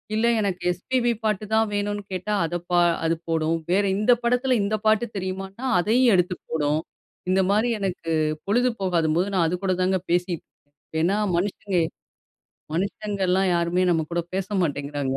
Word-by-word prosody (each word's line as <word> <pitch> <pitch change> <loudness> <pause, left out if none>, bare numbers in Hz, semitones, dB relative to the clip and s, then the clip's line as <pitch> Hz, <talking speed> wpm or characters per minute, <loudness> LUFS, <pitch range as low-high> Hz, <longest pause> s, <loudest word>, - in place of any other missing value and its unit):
இல்ல, 225 +2 +2
எனக்கு 190 -4 -1
எஸ்பிபி 240 +7 0
பாட்டு 215 -1 0
தான் 220 0 +3
வேணும்னு 205 0 -1
கேட்டா, 185 +3 -2
அதை 175 +2 -2
பா 175 - +4 0.3
அது 165 +1 +2
போடும். 160 0 +1 0.2
வேறு 200 +2 +3
இந்த 215 +4 +3
படத்தில, 250 +2 +2
இந்த 205 +2 0
பாட்டு 220 +2 +4
தெரியுமான்னா, 190 +5 -5
அதையும் 235 +6 +4
எடுத்து 180 0 +1
போடும். 150 -1 +1 0.5
இந்த 190 +1 +3
மாதிரி 215 +4 +2
எனக்கு 180 -4 -3 0.4
பொழுது 245 +5 +2
போகாதம்போது, 170 -1 +1
நான் 170 -3 +3
அதுகூட 185 +2 -1
தாங்க 185 +1 +1
பேசி 175 0 +1 0.7
ஏன்னா, 185 +5 +2 0.2
மனுஷங்க 195 0 -1 0.9
மனுஷங்கல்லாம் 190 +1 0
யாருமே 170 +2 +1
நம்ம 165 -2 +2
கூட 170 0 0
பேச 190 -1 -1
மாட்டேங்கிறாங்க. 145 -4 -2
185 Hz, 145 wpm, -24 LUFS, 170-205 Hz, 0.9 s, பா